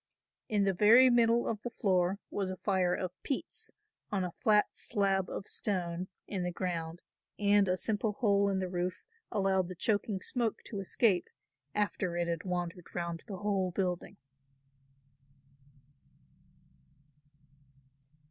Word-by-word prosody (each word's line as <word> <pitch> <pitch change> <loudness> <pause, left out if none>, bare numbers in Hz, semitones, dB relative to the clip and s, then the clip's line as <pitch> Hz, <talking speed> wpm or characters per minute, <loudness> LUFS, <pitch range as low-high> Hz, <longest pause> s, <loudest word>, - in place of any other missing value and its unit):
In 210 -2 +2
the 195 -1 +2
very 230 +7 +7
middle 235 0 +4
of 215 -2 -2
the 240 - -4
floor 185 -4 +1
was 195 -2 -1
a 185 - -3
fire 185 -3 +1
of 185 -1 -3
peats 275 - -2 0.4
on 195 -3 0
a 180 - -3
flat 210 +4 +2
slab 195 -2 0
of 195 - -5
stone 180 -3 -1 0.2
in 195 -3 -3
the 180 - -1
ground 170 -2 -4 0.3
and 205 -1 +4
a 180 0 +1
simple 210 +1 0
hole 200 -3 +2
in 195 - 0
the 190 -1 -1
roof 180 0 -3 0.3
allowed 195 -3 +2
the 185 - -7
choking 205 +1 0
smoke 230 +2 -2
to 205 - -6
escape 195 -1 +2 0.5
after 200 -4 0
it 175 0 0
had 170 +2 -2
wandered 175 -1 -4
round 170 -2 -3
the 195 - -5
whole 195 -1 0
building. 180 -1 -2
190 Hz, 140 wpm, -32 LUFS, 180-210 Hz, 0.5 s, very